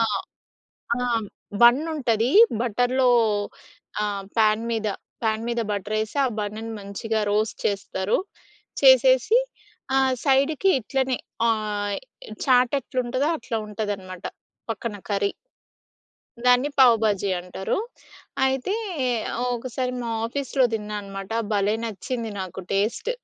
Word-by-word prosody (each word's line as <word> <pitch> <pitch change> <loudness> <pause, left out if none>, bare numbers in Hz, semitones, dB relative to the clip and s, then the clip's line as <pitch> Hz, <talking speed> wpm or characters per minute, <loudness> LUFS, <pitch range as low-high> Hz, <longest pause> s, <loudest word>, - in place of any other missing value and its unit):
ఆ! - - +4 0.9
ఆ! - - -3 0.6
బన్నుంటది. 245 -2 +4 0.3
బటర్‌లో 245 +2 +2 0.9
ఆహ్, 200 -1 -2
ప్యాన్ 215 0 +3
మీద, 220 -1 -1 0.4
ప్యాన్ 220 0 0
మీద 235 0 0
బటరేసి, 215 +4 -2
ఆ - - +2
బన్నని 215 +2 -4
మంచిగా 210 +2 -3
రోస్ట్ 215 +1 0
చేస్తారు, 195 -1 0 0.6
చేసేసి 260 - +6 0.6
ఆహ్, 265 -1 +3
సైడ్‌కి 285 +7 +3
ఇట్లనే 265 +2 0 0.3
ఆహ్, 210 -2 -1 0.3
య్ 215 - -8
చాటెట్లుంటదో 255 +1 +2
అట్లా 225 -4 -3
ఉంటాదనమాట. 200 -4 -5 0.5
పక్కన 220 0 -4 0.2
కర్రీ. 200 0 +1 1.1
దాన్ని 250 +3 +5
పావ్ 255 -3 +8
బాజీ 200 -2 +1
అంటారు. 180 +2 -3 0.7
అయితే, 265 +8 0 0.8
ఒకసారి 255 +1 -3
మా 235 - -3 0.2
ఆఫీస్‌లో 270 +1 0
దిన్నా 210 -1 -4
అనమాట. 195 0 -8 0.2
భలే 205 +1 +2
నచ్చింది 230 +2 -4
నాకు 185 0 -6
టేస్ట్. 210 - 0
225 Hz, 105 wpm, -24 LUFS, 205-255 Hz, 1.1 s, పావ్